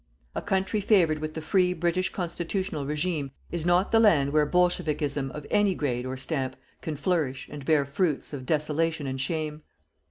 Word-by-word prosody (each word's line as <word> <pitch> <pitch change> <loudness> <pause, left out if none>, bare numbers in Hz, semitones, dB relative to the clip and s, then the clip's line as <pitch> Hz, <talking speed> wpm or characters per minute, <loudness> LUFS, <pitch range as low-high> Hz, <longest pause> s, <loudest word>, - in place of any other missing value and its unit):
A - - -3
country 190 +2 0
favoured 175 -7 +3
with 155 0 -5
the 160 - -4
free 180 +1 +3
British 175 +2 0
constitutional 175 -3 -3
regime 150 -1 -1 0.2
is 170 -1 -2
not 175 +2 +3
the 225 - +5
land 150 -11 +4
where 150 -1 +4
bolshevikism 150 -5 +1
of 150 +1 -8
any 205 -3 +3
grade 125 -5 -1
or 130 +1 -4
stamp, 130 -2 -2 0.3
can 155 - -3
flourish 145 -3 -1
and 145 -2 -7
bear 145 -1 +3
fruits 150 +1 -1
of 130 -3 -6
desolation 155 0 0
and 130 -1 -3
shame. 155 +1 -2
155 Hz, 170 wpm, -27 LUFS, 145-180 Hz, 0.3 s, the